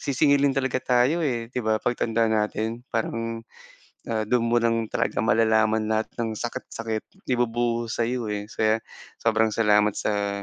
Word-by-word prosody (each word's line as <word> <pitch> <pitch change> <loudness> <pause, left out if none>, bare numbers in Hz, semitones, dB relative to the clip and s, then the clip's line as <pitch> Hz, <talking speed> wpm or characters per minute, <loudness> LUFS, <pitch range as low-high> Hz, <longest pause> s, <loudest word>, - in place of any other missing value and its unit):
sisingilin 140 0 +2
talaga 130 -1 0
tayo 125 +8 +2
eh, 120 -6 -2
'di 125 - -1
ba 110 -1 +1
'pag 125 - -1
tanda 115 0 +2
natin 110 +2 -1
parang, 115 0 -3 0.7
ah, 110 -1 -1
dun 115 0 +1
mo 120 - +4
lang 115 -1 0
talaga 100 - 0
malalaman 110 -1 +3
lahat 110 0 0
ng 115 -2 -1
sakit-sakit 115 -1 -5 0.2
ibubuhos 120 -1 0
sa'yo 120 0 -1
eh. 105 +1 -6
So 110 - 0
yan, 110 +1 +2 0.4
sobrang 110 -1 +2
salamat 105 -2 +3
sa 100 -1 -1
115 Hz, 155 wpm, -25 LUFS, 110-120 Hz, 0.7 s, mo